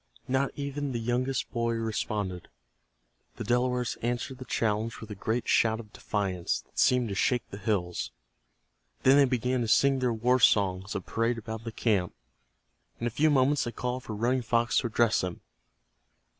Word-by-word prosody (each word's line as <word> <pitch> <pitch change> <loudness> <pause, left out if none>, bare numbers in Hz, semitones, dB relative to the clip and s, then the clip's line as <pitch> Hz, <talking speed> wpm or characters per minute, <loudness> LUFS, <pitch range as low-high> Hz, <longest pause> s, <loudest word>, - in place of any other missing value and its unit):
Not 130 +1 +1
even 140 -1 -3
the 120 - -1
youngest 125 +3 -1
boy 115 0 0
responded. 105 -5 -3 0.9
The - - -5
Delawares 125 +1 0
answered 120 +2 -2
the 130 - -7
challenge 110 0 -1
with 110 -1 -9
a - - -2
great 110 +4 -2
shout 110 0 +3
of 105 -3 -11
defiance 90 - -2
that - - -10
seemed 125 -3 +3
to - - -3
shake 125 +4 +1
the 100 - -7
hills. 95 - -1 0.9
Then 135 +2 +6
they 140 - +7
began 125 0 0
to 115 - -1
sing 135 +4 +4
their 125 -1 +1
war 120 +3 +2
songs, 95 -3 +3
and - - -4
parade 115 +1 0
about 110 0 -6
the 115 - -4
camp. 100 -6 0 0.8
In 115 - -3
a 120 - 0
few 155 +7 +3
moments 140 0 +3
they 120 - -3
called 125 +2 -3
for 110 - -6
Running 125 +4 +1
Fox 120 0 +2
to 120 - -1
address 115 0 +2
them. 90 -1 -4
115 Hz, 175 wpm, -28 LUFS, 110-125 Hz, 0.9 s, they